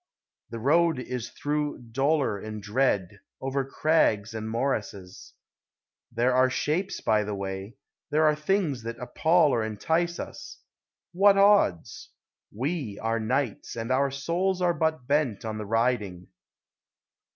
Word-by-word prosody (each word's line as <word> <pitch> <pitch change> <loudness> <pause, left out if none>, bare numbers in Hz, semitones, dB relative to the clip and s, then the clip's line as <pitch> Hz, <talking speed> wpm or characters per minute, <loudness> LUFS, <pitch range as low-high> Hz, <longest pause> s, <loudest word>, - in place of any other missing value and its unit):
The 115 - -6
road 160 +6 +3
is 125 -2 -5
through 150 0 -2
dolor 135 -4 +1
and 110 +1 -6
dread, 105 -3 0 0.2
over 135 +1 -1
crags 130 -7 +1
and 110 0 -5
morasses; 110 -6 -4 0.8
There 120 +2 +1
are 130 0 +4
shapes 150 +9 -2
by 110 -1 +2
the 105 0 -4
way, 95 +2 -5 0.3
there 155 +1 +3
are 155 - +5
things 150 - 0
that 115 +1 -6
appall 155 +6 +2
or 115 - +1
entice 160 +11 -1
us: - - -8 0.5
What 195 +2 +5
odds? 195 - +3 0.4
We 130 - -3
are 115 0 -1
knights, 125 +1 -2
and 115 +1 -4
our 135 +2 +2
souls 170 +7 -1
are 175 -1 +2
but 160 -4 -1
bent 140 -7 0
on 110 -1 -4
the 105 - -6
riding 110 -6 -1
130 Hz, 135 wpm, -27 LUFS, 110-155 Hz, 0.8 s, are